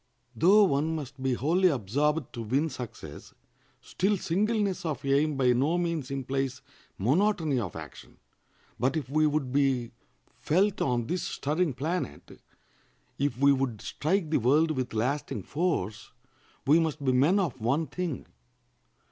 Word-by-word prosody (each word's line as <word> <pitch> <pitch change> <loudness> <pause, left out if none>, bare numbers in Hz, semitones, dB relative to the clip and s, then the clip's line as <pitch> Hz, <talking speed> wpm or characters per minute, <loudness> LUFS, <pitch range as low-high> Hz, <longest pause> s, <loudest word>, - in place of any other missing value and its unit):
Though 195 - +6
one 155 -2 +1
must 140 -3 -7
be 130 -1 +1
wholly 170 +9 +2
absorbed 145 - -1
to 120 - -5
win 135 +8 0
success, 110 - -9 0.5
still 200 +2 0
singleness 200 +2 0
of 150 -6 -4
aim 140 +2 +2
by 125 -2 +4
no 145 +8 +1
means 170 -6 -2
implies 135 -1 -3 0.3
monotony 155 - +1
of 100 -8 -5
action; 80 -3 -10 0.6
but 130 +5 +1
if 150 - -3
we 155 +2 +3
would 145 -4 -1
be 135 -4 +1 0.5
felt 185 +10 +1
on 120 -3 +1
this 175 +7 -2
stirring 155 +2 -1
planet, 155 - -4 0.8
if 140 -2 0
we 140 +1 +5
would 130 -5 -1
strike 160 - -1
the 155 - +3
world 150 +7 +3
with 130 -5 -3
lasting 130 +7 -1
force, 130 - -2 0.5
we 150 +4 +5
must 155 -3 -2
be 130 - +3
men 140 +10 +4
of 165 - -1
one 135 +8 +1
thing. 160 0 -4
145 Hz, 145 wpm, -28 LUFS, 130-165 Hz, 0.8 s, Though